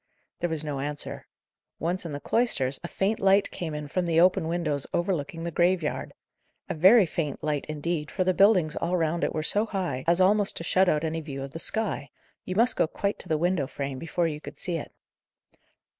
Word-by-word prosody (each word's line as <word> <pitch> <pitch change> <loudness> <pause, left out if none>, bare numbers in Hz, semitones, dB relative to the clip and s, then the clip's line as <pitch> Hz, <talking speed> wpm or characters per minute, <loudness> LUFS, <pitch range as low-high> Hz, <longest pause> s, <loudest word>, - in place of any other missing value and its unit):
There 175 - -1
was 160 -2 -1
no 145 -3 -3
answer. 145 +1 -5 0.5
Once 175 +2 -2
in - - -6
the 145 - -4
cloisters, 140 - 0
a - - -3
faint 200 +5 -1
light 195 +1 +4
came 160 -4 -4
in 150 -1 -5
from 175 +4 -1
the 165 -1 +3
open 180 -1 +4
windows 160 -5 -1
overlooking 170 -2 -2
the 170 - -3
graveyard. 175 -1 0 0.6
A - - -2
very 190 +7 +6
faint 155 -3 -3
light, 150 -2 -1
indeed, 155 0 -2
for 185 - -1
the 185 0 +2
buildings 185 -5 +4
all 180 +1 0
round 165 0 0
it - - +1
were 155 - -1
so 210 +7 +2
high, 185 -11 -3
as 170 +1 +4
almost 205 +2 +3
to - - -4
shut 185 +2 +3
out 150 0 +1
any 160 0 -2
view 135 -3 -6
of 135 - -7
the 165 - -7
sky: 200 -9 0 0.4
you 185 - -4
must 235 +4 +3
go - - +3
quite 200 +5 -2
to 180 - -6
the 155 - +2
window 170 -3 +1
frame 140 -2 -5
before 165 +3 -1
you 150 -2 -5
could - - -10
see 175 -2 -2
it. 150 - -7
170 Hz, 215 wpm, -27 LUFS, 150-185 Hz, 0.6 s, very